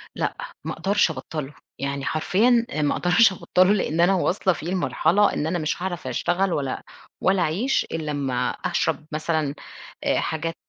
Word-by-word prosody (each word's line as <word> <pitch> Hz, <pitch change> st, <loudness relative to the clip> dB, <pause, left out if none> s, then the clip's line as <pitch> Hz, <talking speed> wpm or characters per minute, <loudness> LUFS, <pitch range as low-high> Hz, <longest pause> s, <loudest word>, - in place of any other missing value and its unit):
لأ -, -, -2 dB, 0.3 s
ما -, -, -2 dB
أقدرش 190 Hz, +1 st, +2 dB
أبطّله 150 Hz, +1 st, -6 dB, 0.3 s
يعني 140 Hz, 0 st, -3 dB
حرفيًا 230 Hz, +9 st, +2 dB
آآ 155 Hz, -, -2 dB
ما 145 Hz, -, +2 dB
أقدرش 190 Hz, +4 st, +5 dB
أبطّله، 185 Hz, +2 st, +3 dB
لأن 170 Hz, -4 st, 0 dB
أنا 185 Hz, +3 st, +5 dB
واصْلة 185 Hz, 0 st, +1 dB
فيه 160 Hz, +1 st, -7 dB
لمرحلة 185 Hz, +1 st, +2 dB
إن 150 Hz, -, -1 dB
أنا 175 Hz, +1 st, -1 dB
مش 155 Hz, +3 st, -2 dB
هاعرف 175 Hz, -7 st, -4 dB
أشتغل 175 Hz, +9 st, 0 dB
ولا 135 Hz, -3 st, -2 dB, 0.4 s
ولا 190 Hz, -1 st, +3 dB
أعيش 195 Hz, -, +1 dB
إلّا 155 Hz, -2 st, -3 dB
أمّا 135 Hz, -4 st, -1 dB
أشرب 150 Hz, -, -1 dB
مثلًا 155 Hz, -2 st, -1 dB, 0.5 s
آآ -, -, +2 dB
حاجات 165 Hz, +1 st, -2 dB
165 Hz, 165 wpm, -24 LUFS, 150-190 Hz, 0.5 s, أقدرش